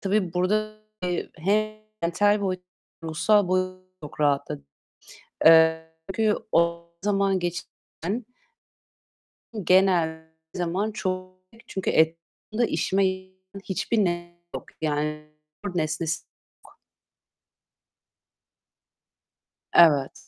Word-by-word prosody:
tabii 195 -3 0
burada 215 +4 +1 0.6
hem 215 +5 +1 0.3
mental 205 +5 +3
boyutta, 185 -2 -2 0.4
ruhsal 185 +5 +3
boyutta 185 0 -1 0.2
çok 150 0 -9
rahatladım. 140 - 0 0.8
Eee, 160 0 +6 0.2
çünkü 220 -1 +2 0.2
o 170 0 +2 0.2
zaman 195 -2 +2
geçiren 180 +4 -5 1.4
genel 175 -4 +3 0.3
zaman 185 +4 -1
çok. 185 -3 -3 0.3
Çünkü 190 - -3
etrafımda 165 +8 0
işime 195 -2 +1
yaramayan 185 0 -5 0.3
hiçbir 200 +4 -1
nesne 175 -3 0 0.2
yok. - - -5 0.2
Yani 150 0 -1 0.5
nesnesi 160 +1 -1 0.4
yok. - - -21 2.9
Evet. 145 -5 +4
180 Hz, 85 wpm, -25 LUFS, 160-195 Hz, 2.9 s, Eee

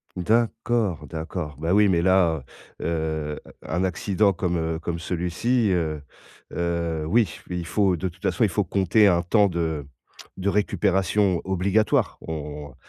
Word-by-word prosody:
D'accord, 110 -4 0
d'accord, 80 0 -5
bah 80 +4 0
oui 105 0 +5
mais 85 -2 +2
là, 85 -6 +3 0.4
heu - - -4
heu, 80 -2 -2 0.2
un 85 +4 -1
accident 100 +2 +1
comme, 90 -1 -1
heu, 80 0 -1
comme 85 0 -4
celui-ci, 95 +7 0
heu 80 -4 -1 0.5
heu, 85 -2 -1
oui 110 +4 +3 0.2
il 90 -1 -3
faut 95 +1 +2
de 90 +2 -3
toute 90 +2 -18
façon 120 - +1
il 105 - +3
faut 105 - +1
compter 100 +3 +3
un 85 -2 +3
temps 105 +3 +4
de 80 -5 -2 0.5
de 95 +1 0
récupération 95 -2 +1
obligatoire, 95 +3 +1
on 75 -3 -6
90 Hz, 150 wpm, -24 LUFS, 80-100 Hz, 0.5 s, oui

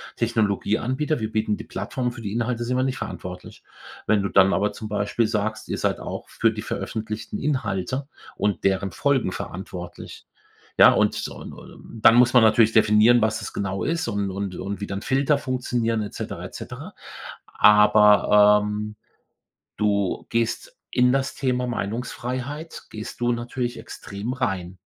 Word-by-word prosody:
Technologieanbieter. 115 - 0
Wir 110 -1 -3
bieten 110 -1 0
die - - -8
Plattform 125 +5 -3
für 120 -1 -10
die 100 - -4
Inhalte 120 +1 -1
sind 125 +2 -1
wir 130 - +1
nicht 130 0 -1
verantwortlich.“ 90 -6 -8 0.4
Wenn 105 -2 +3
du 100 - -1
dann 95 0 +5
aber 105 +1 +1
zum 110 +1 -7
Beispiel 105 +2 0
sagst, 110 0 -2
ihr - - -2
seid - - -1
auch - - -6
für 115 - +1
die 105 0 -6
veröffentlichten 110 -1 -4
Inhalte 130 -1 -2 0.3
und 105 -1 -1
deren 95 0 +1
Folgen 135 0 +1
verantwortlich. 90 -1 -8 0.5
Ja, - - +9
und - - +1
und 115 - -11
dann 115 - +7
muss 120 0 +5
man 125 - +7
natürlich 110 0 +5
definieren, 110 +2 +5
was 110 0 +1
das 110 - -7
genau 95 -1 -2
ist 165 -4 -1
und 100 -3 -1
und 95 0 -4
und 100 +1 -5
wie - - -2
dann 95 0 -4
Filter 135 +4 +1
funktionieren 120 -4 -1
et 105 - -6
cetera, - - -6
et - - -8
cetera. - - -8 0.5
Aber, 105 0 +6
ähm, 105 +1 -4 0.8
du 100 -2 0
gehst 115 - -2
in 125 0 +4
das 135 0 0
Thema 125 -2 -1
Meinungsfreiheit 125 +6 -4
gehst 110 +2 -8
du 120 0 +2
natürlich 120 +1 -3
extrem 100 +5 -6
rein 95 -8 -3
110 Hz, 160 wpm, -24 LUFS, 105-125 Hz, 0.8 s, Ja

